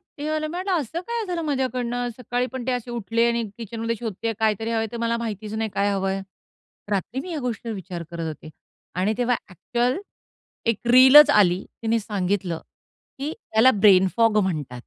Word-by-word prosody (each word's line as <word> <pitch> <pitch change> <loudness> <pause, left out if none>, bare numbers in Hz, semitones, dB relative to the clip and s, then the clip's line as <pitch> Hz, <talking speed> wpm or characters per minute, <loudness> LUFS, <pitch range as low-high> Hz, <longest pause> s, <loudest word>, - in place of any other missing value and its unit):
म्हटलं 310 +3 -3
असं 325 -1 -1
काय 470 -1 -2
झालं 345 -2 -2
माझ्याकडनं? 250 -4 -1
सकाळी 245 0 -2
पण 260 -2 -5
ते 260 - +1
असे 245 -1 -3
उठले 230 0 0
आणि 235 0 0 0.2
किचनमध्ये 230 +1 -3
शोधतेय 225 0 -3
कायतरी 220 +1 0
हवंय. 225 -1 0
ते - - -4
मला 230 0 0
माहितीच 215 -2 -5
नाही 220 -1 -2
काय 200 +1 +2
हवंय? 195 0 -1 0.7
रात्री 205 +6 -1
मी 365 - -8
ह्या 315 -4 -3
गोष्टीवर 230 -2 -4
विचार 180 -3 -6
करत 165 -1 -4
होते 155 0 -8 0.4
आणि 185 +5 +1
तेव्हा 245 0 +2
ॲक्चुअल 240 - -1 0.7
1 215 - -2 0.2
रीलच 265 +4 +9
आली. 185 -3 +4 0.2
तिने 230 +1 +2
सांगितलं 195 -4 -2 0.6
की 290 +3 -3 0.2
त्याला 225 +4 +6
ब्रेन 190 -2 +6
फॉग 225 -2 +4
म्हणतात. 150 -9 -3
230 Hz, 165 wpm, -24 LUFS, 200-255 Hz, 0.7 s, रीलच